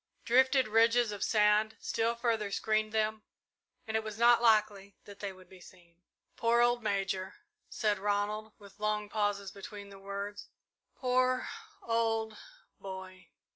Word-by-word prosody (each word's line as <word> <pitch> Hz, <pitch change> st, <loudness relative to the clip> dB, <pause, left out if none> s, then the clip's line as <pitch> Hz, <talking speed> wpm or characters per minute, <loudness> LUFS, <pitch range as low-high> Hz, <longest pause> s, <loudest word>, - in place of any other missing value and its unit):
Drifted 260 Hz, +1 st, +4 dB
ridges 230 Hz, +1 st, +4 dB
of 205 Hz, -1 st, -4 dB
sand 210 Hz, 0 st, +3 dB
still 230 Hz, +1 st, -1 dB
further 230 Hz, -3 st, -1 dB
screened 215 Hz, +1 st, 0 dB
them, 220 Hz, 0 st, 0 dB, 0.6 s
and 220 Hz, -1 st, -4 dB
it 220 Hz, -, +1 dB
was 215 Hz, -1 st, -6 dB
not 235 Hz, 0 st, +5 dB
likely 210 Hz, -3 st, +2 dB
that 200 Hz, -1 st, -12 dB
they 200 Hz, -1 st, -4 dB
would 185 Hz, -1 st, -16 dB
be 185 Hz, -1 st, -16 dB
seen. 175 Hz, -1 st, -18 dB, 0.3 s
"Poor 235 Hz, +1 st, +2 dB
old 240 Hz, 0 st, +3 dB
Major," 195 Hz, -2 st, -2 dB, 0.3 s
said 210 Hz, -2 st, 0 dB
Ronald, 210 Hz, +2 st, -1 dB
with 200 Hz, -1 st, -16 dB
long 210 Hz, 0 st, -1 dB
pauses 205 Hz, -2 st, -1 dB
between 200 Hz, 0 st, -9 dB
the 195 Hz, -1 st, -12 dB
words; 200 Hz, +1 st, -6 dB, 0.5 s
"poor 255 Hz, 0 st, +1 dB, 0.4 s
old 225 Hz, -1 st, 0 dB, 0.4 s
boy!" 190 Hz, -1 st, -9 dB
215 Hz, 140 wpm, -31 LUFS, 200-225 Hz, 0.6 s, not